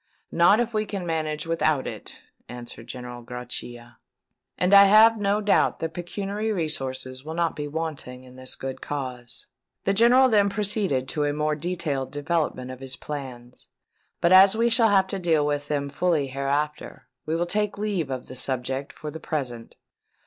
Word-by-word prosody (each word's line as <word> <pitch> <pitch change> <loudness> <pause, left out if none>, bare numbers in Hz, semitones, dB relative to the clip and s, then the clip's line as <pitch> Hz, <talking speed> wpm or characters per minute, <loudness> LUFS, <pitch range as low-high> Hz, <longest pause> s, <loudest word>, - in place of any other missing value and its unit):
"Not 175 +6 +5
if 235 -1 -1
we 215 0 0
can 195 -3 -4
manage 155 -2 -2
without 155 -4 +1
it," - - -8 0.3
answered 120 -1 -9
General 125 -1 -7
Grachia; 120 -1 -7 0.6
"and 180 +2 +2
I 200 0 +10
have 220 +2 +6
no 205 +1 +1
doubt 205 -1 +2
that 165 0 -4
pecuniary 200 +5 -3
resources 130 -7 -3
will 160 +2 -6
not 170 -1 0
be 145 0 -4
wanting 145 -5 -5
in 130 0 -15
this 130 0 -7
good 135 0 -6
cause." 125 -4 -6 0.4
The 195 - +1
General 240 +5 +6
then 205 -4 +3
proceeded 200 - 0
to 150 -1 -1
a 145 - 0
more 150 +1 0
detailed 150 -4 -3
development 145 -4 -2
of 130 - -9
his 130 -1 -3
plans; 130 -5 -8 0.5
but 170 - +3
as 190 +3 +7
we 235 +1 +2
shall 230 -1 +4
have 195 -2 +4
to 190 0 -4
deal 160 -4 +2
with 145 0 -1
them 145 -1 -1
fully 155 +1 0
hereafter, 140 +3 -3 0.2
we 160 - 0
will 170 +1 0
take 210 +3 -1
leave 200 -8 -2
of 130 -2 -4
the - - -10
subject 130 +1 -2
for 150 - -8
the 160 - -8
present. 125 -8 -5
155 Hz, 175 wpm, -25 LUFS, 130-195 Hz, 0.6 s, I